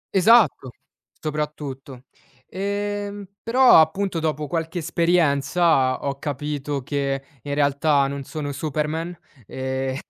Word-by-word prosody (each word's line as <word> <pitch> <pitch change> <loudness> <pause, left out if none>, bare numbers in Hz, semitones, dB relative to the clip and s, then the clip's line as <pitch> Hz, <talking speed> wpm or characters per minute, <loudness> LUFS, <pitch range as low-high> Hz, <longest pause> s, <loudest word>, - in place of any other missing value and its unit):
Esatto! 205 - +5 0.5
Soprattutto, 145 -4 -5 0.4
ehm 205 +1 -4 0.2
però 250 -3 +6
appunto, 185 +2 0
dopo 155 -1 -2
qualche 165 +3 -3
esperienza, 165 -4 +2
ho 140 -1 -3
capito 145 -1 -3
che 135 0 -2 0.2
in 145 +4 -5
realtà, 145 0 +2
non 140 0 -4
sono 145 0 -5
Superman, 155 +4 -3 0.3
ehm 130 0 -3
150 Hz, 100 wpm, -23 LUFS, 140-175 Hz, 0.5 s, però